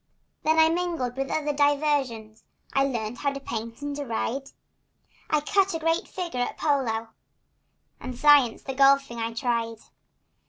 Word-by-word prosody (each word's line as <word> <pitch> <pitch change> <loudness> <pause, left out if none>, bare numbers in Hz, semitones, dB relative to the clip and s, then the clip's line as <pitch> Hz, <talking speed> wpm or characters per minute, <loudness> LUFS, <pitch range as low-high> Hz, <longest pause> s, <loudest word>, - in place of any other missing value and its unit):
Then 315 +1 +2
I 320 0 +7
mingled 330 -7 -1
with 270 0 -3
other 300 -1 -1
diversions. 280 -7 0 0.3
I 275 0 +3
learned 235 -3 -3
how 280 - 0
to 275 - -5
paint 230 0 -6
and 290 0 -3
to 290 - -3
ride; 260 +2 -3 0.8
I 305 -1 +2
cut 390 +3 +2
a - - -2
great 330 +1 0
figure 345 -9 -5
at 245 - -2
polo— 235 -7 0 0.9
The 255 -1 -6
science 285 -5 +5
of 270 -1 -6
golfing 275 -3 +4
I 230 0 -2
tried. 230 -2 -1
275 Hz, 155 wpm, -26 LUFS, 235-295 Hz, 0.9 s, I